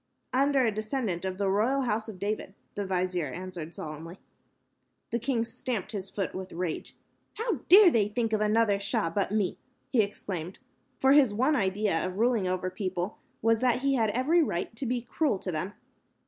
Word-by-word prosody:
"Under 275 Hz, 0 st, +3 dB
a 225 Hz, -, +2 dB
descendant 215 Hz, -4 st, -2 dB
of 185 Hz, -1 st, -3 dB
the 200 Hz, 0 st, 0 dB
royal 225 Hz, +8 st, +2 dB
House 220 Hz, -2 st, -1 dB
of 205 Hz, -, -8 dB
David," 200 Hz, 0 st, -3 dB, 0.2 s
the 205 Hz, -1 st, -3 dB
vizier 180 Hz, -3 st, 0 dB
answered, 175 Hz, 0 st, -7 dB
solemnly. 160 Hz, +3 st, -7 dB, 0.9 s
The 235 Hz, -, 0 dB
king 235 Hz, -1 st, 0 dB
stamped 235 Hz, -4 st, -4 dB
his 195 Hz, -3 st, -4 dB
foot 195 Hz, -2 st, -3 dB
with 185 Hz, 0 st, -6 dB
rage. 175 Hz, -2 st, -4 dB, 0.4 s
"How 455 Hz, +2 st, -1 dB
dare 380 Hz, -1 st, +9 dB
they 215 Hz, -6 st, +3 dB
think 225 Hz, +1 st, -1 dB
of 215 Hz, -, +2 dB
any 215 Hz, +1 st, +2 dB
other 210 Hz, -3 st, +3 dB
Shah 165 Hz, -4 st, 0 dB
but 195 Hz, +3 st, 0 dB
me," 205 Hz, -3 st, 0 dB, 0.3 s
he 245 Hz, -, +5 dB
exclaimed, 190 Hz, -4 st, -4 dB, 0.4 s
for 265 Hz, -, +4 dB
his 270 Hz, -7 st, +5 dB
one 265 Hz, +7 st, +3 dB
idea 195 Hz, -, +1 dB
of 185 Hz, +1 st, -3 dB
ruling 230 Hz, -4 st, +2 dB
over 185 Hz, 0 st, -1 dB
people 185 Hz, -1 st, -3 dB, 0.2 s
was 225 Hz, 0 st, +4 dB
that 250 Hz, +1 st, +2 dB
he 275 Hz, 0 st, +3 dB
had 225 Hz, -5 st, +2 dB
every 265 Hz, +10 st, +3 dB
right 185 Hz, -, -2 dB
to 265 Hz, -, -3 dB
be 245 Hz, 0 st, -1 dB
cruel 285 Hz, -3 st, 0 dB
to 185 Hz, -, -4 dB
them. 180 Hz, +5 st, -3 dB
210 Hz, 190 wpm, -28 LUFS, 185-245 Hz, 0.9 s, dare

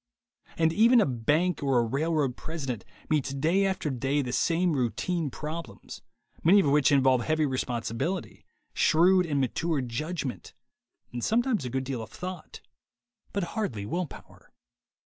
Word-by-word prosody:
And 160 Hz, 0 st, +2 dB
even 230 Hz, +6 st, +6 dB
a 215 Hz, -, +4 dB
bank 150 Hz, +8 st, 0 dB
or 135 Hz, -3 st, +2 dB
a 120 Hz, -, +4 dB
railroad 140 Hz, +1 st, 0 dB
president 135 Hz, -9 st, -5 dB, 0.2 s
meets 140 Hz, -3 st, 0 dB
day 170 Hz, +8 st, +2 dB
after 185 Hz, -6 st, -2 dB
day 135 Hz, +3 st, 0 dB
the 125 Hz, -1 st, -4 dB
same 170 Hz, +3 st, +2 dB
routine 150 Hz, +5 st, -1 dB
problems, 155 Hz, +4 st, -7 dB, 0.4 s
many 190 Hz, +5 st, +6 dB
of -, -, -1 dB
which 145 Hz, 0 st, +4 dB
involve 130 Hz, -3 st, +4 dB
heavy 155 Hz, +2 st, +1 dB
responsibility, 130 Hz, -, -3 dB, 0.3 s
shrewd 180 Hz, +3 st, +4 dB
and 145 Hz, -3 st, 0 dB
mature 150 Hz, +4 st, 0 dB
judgment, 135 Hz, +3 st, -4 dB, 0.6 s
and 120 Hz, -1 st, -4 dB
sometimes 230 Hz, -, +1 dB
a -, -, -3 dB
good 130 Hz, +2 st, -2 dB
deal 130 Hz, -3 st, -4 dB
of 110 Hz, -, -8 dB
thought, 185 Hz, 0 st, -8 dB, 0.7 s
but 200 Hz, -, -1 dB
hardly 120 Hz, -, -3 dB
will 175 Hz, -, -2 dB
power. -, -, -15 dB
150 Hz, 145 wpm, -28 LUFS, 130-175 Hz, 0.7 s, even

